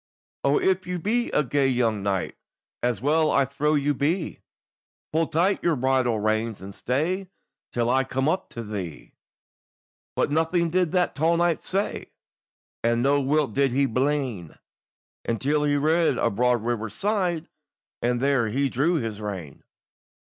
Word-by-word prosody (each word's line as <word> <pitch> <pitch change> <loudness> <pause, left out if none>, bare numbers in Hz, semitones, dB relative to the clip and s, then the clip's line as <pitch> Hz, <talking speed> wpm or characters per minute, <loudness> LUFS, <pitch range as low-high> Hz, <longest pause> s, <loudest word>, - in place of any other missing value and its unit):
"O - - +3
if 380 - +1
you 180 0 -2
be 230 +8 0
a 150 - +2
gay 140 +1 +1
young 120 -5 +1
knight, 95 -2 -1 0.5
As 120 -4 0
well 155 +2 +3
I 140 - +3
trow 145 +3 0
you 145 0 +1
be, 160 +6 -1 0.7
Pull 160 0 +2
tight 180 +5 +1
your 170 -2 +2
bridle 130 -3 +1
reins, 110 +1 0
and 95 +1 -9
stay 170 - -1 0.4
Till 120 -1 0
I 130 +2 +3
come 135 +1 -1
up 180 +4 0
to 115 - -5
thee." 95 -8 -6 1.0
But - - +1
nothing 165 +2 +1
did 180 -2 +1
that 180 -1 +2
tall 160 +4 +2
knight 175 -1 +1
say, 195 +2 -2 0.8
And 115 +1 +2
no 140 +1 +3
whit 140 -2 +1
did 135 -1 +2
he 140 +2 +3
blin, 130 - -1 0.7
Until 145 +6 0
he 145 0 +2
reached 160 +3 +2
a - - +1
broad 120 +2 +1
river's 115 -3 -2
side 185 -6 0 0.5
And 120 0 +1
there 135 -3 +2
he 135 +4 0
drew 150 +8 +1
his 115 -8 -3
rein. 95 -9 -6
140 Hz, 155 wpm, -25 LUFS, 115-160 Hz, 1.0 s, O